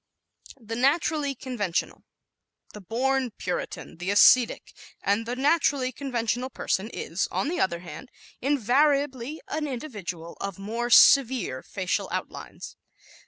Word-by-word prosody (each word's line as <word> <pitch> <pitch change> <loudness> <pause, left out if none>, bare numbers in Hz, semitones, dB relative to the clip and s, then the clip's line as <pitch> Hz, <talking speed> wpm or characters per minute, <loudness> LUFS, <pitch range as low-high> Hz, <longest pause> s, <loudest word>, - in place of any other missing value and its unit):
The 225 -1 -6
Naturally 285 +2 +1
Conventional 220 -9 -3
¶ - - -34 0.7
The 210 - -9
"born 255 +6 0
Puritan," 180 - -5
the 180 +2 -4
ascetic, 230 +4 +5 0.3
and 210 +3 0
the 245 - -2
naturally 280 -2 +2
conventional 245 -1 -2
person 215 -4 -2
is, 170 +4 -2
on 280 - -1
the 350 - -2
other 170 -2 0
hand, 180 - -10 0.3
invariably 280 +1 +1
an 305 0 -3
individual 205 - -6
of 195 -3 -4
more 230 +5 -3
severe 245 - +5
facial 185 -2 -3
outlines. - - -6
245 Hz, 120 wpm, -26 LUFS, 200-275 Hz, 0.7 s, ascetic